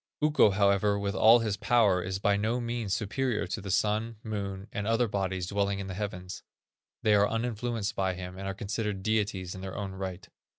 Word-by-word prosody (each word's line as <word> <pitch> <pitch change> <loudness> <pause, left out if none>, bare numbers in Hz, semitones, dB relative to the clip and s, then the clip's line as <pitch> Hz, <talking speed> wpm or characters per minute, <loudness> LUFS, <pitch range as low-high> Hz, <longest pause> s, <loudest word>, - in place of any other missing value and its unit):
Ukko, 150 -7 +5
however, 100 +1 +3
with 100 0 -2
all 110 +4 +7
his 105 -3 -1
power, 105 -5 +3
is 95 +1 -3
by 100 +1 +2
no 110 +4 0
means 120 -3 -3
superior 110 +5 0
to 110 - -4
the 100 - -7
Sun, 110 +4 +1
Moon, 100 -2 -4
and 105 0 -3
other 115 +1 +2
bodies 95 -3 -2
dwelling 100 +1 0
in 100 - -4
the 95 - -5
heavens; 90 -2 -5 0.6
they 105 - +4
are 105 0 +4
uninfluenced 115 -2 -2
by 95 -1 0
him, 90 0 -7
and 95 +1 -6
are 95 - -3
considered 105 -2 -3
deities 100 -4 0
in 95 - -8
their 95 -1 -6
own 100 -2 -3
right. 95 -1 -6
100 Hz, 200 wpm, -29 LUFS, 95-110 Hz, 0.6 s, all